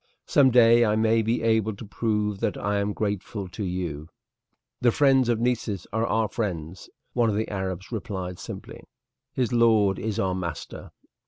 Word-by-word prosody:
"Some 135 -2 +5
day 120 -1 +6
I 105 -2 +2
may 110 +1 +3
be 115 +1 -1
able 110 -2 +1
to 110 - -9
prove 105 -1 -1
that - - -1
I 100 0 -1
am 100 +1 -1
grateful 100 -1 -3
to 100 +4 -6
you." 85 -5 -4 0.7
"The 120 - +4
friends 135 -2 +3
of 115 -2 +1
Nessus 115 -5 -1
are 110 +1 0
our 110 -1 +1
friends," 90 -6 -4 0.2
one 120 -2 +2
of 105 - -1
the 110 +1 -1
Arabs 95 -1 -4
replied 95 -6 -5
simply; - - -8 0.5
"his 125 -1 -1
lord 110 -5 +4
is 110 -1 -3
our 95 -1 0
master." 85 -5 -6
105 Hz, 170 wpm, -25 LUFS, 95-115 Hz, 0.7 s, day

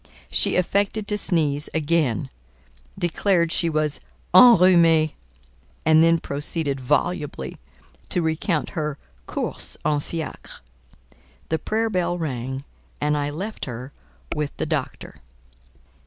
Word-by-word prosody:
She - - +4
affected 200 +3 0
to 210 - +1
sneeze 150 -6 0
again, 155 - 0 0.7
declared 175 0 +1
she 170 - +2
was 155 -2 0 0.3
"enrhumée," 175 -7 +7 0.7
and 160 0 +6
then 165 0 +5
proceeded 145 -1 -3
volubly 145 - -2 0.5
to 175 - +2
recount 160 0 -1
her 150 -5 -3 0.3
"courses - - -2
en 150 -1 +2
fiacre." 160 +1 -7 0.9
The 160 - 0
prayer 225 +1 -1
bell 175 -2 0
rang, 135 -4 -4 0.4
and 150 0 +1
I 145 -1 -1
left 195 +9 -5
her 125 +1 -7 0.4
with 150 -1 -3
the - - -2
doctor. - - -4
160 Hz, 110 wpm, -23 LUFS, 145-175 Hz, 0.9 s, enrhumée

